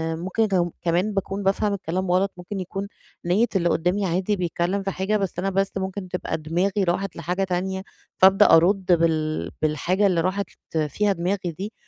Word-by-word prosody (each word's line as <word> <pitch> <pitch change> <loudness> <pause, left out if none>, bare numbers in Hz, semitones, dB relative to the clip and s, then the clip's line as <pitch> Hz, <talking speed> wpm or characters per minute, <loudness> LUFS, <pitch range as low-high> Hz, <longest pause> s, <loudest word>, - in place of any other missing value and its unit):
ممكن 185 +7 0
كم 175 -4 +1
كمان 180 +5 +1
باكون 195 0 -2
بافهم 200 +2 +1
الكلام 185 -1 -2
غلط، 190 +2 +2
ممكن 185 +3 -6
يكون 195 +2 -4 0.4
نية 195 +7 +3
اللي 175 -2 +2
قدامي 180 +5 +1
عادي 185 +4 0
بيتكلم 180 +2 -1
في 195 - -2
حاجة، 195 +3 0
بس 195 -4 -3
أنا 195 +2 0
بس 195 0 0
ممكن 190 0 -4
تبقى 180 -2 -3
دماغي 180 +6 0
راحت 185 +1 -1
لحاجة 180 +3 -2
تانية، 190 +1 -2 0.3
فابدأ 195 +2 +6
أرد 185 +4 +3
بال 155 - +1
بالحاجة 175 +6 +1
اللي 175 -3 +2
راحت 190 +3 -1 0.4
فيها 205 +8 +1
دماغي 180 0 -2
دي، 195 +7 -6
185 Hz, 170 wpm, -24 LUFS, 175-195 Hz, 0.4 s, فابدأ